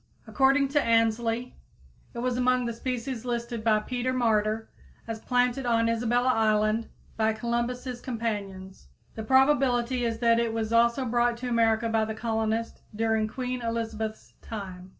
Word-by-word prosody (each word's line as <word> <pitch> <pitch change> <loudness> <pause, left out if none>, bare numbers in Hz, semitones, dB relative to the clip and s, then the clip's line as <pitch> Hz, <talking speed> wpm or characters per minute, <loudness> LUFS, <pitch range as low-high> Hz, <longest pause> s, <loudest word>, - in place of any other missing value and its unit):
According 275 0 +3
to 290 +1 +2
Ainslie, 230 +1 +1 0.6
it - - -7
was 245 +1 -1
among 250 0 +2
the 235 - -2
species 245 0 -4
listed 235 -2 -3
by 220 -1 +4
Peter 250 +2 -2
Martyr 220 -3 +1 0.4
as 225 -1 -4
planted 250 +2 0
on 230 -1 +2
Isabella 240 +2 +1
Island 215 0 +1 0.3
by 220 0 +2
Columbus's 240 +2 -3
companions. 200 - -5 0.3
The 220 - -6
probability 260 0 +3
is 230 -1 -1
that 230 0 +3
it 230 -1 0
was 225 0 -2
also 235 +3 +3
brought 240 0 +1
to 250 +1 -4
America 230 -1 +2
by 225 -1 +1
the 220 0 -5
colonists 225 0 -2
during 220 0 +1
Queen 250 +2 -4
Elizabeth's 225 -1 -4
time. 190 -4 -8
230 Hz, 150 wpm, -27 LUFS, 220-245 Hz, 0.6 s, by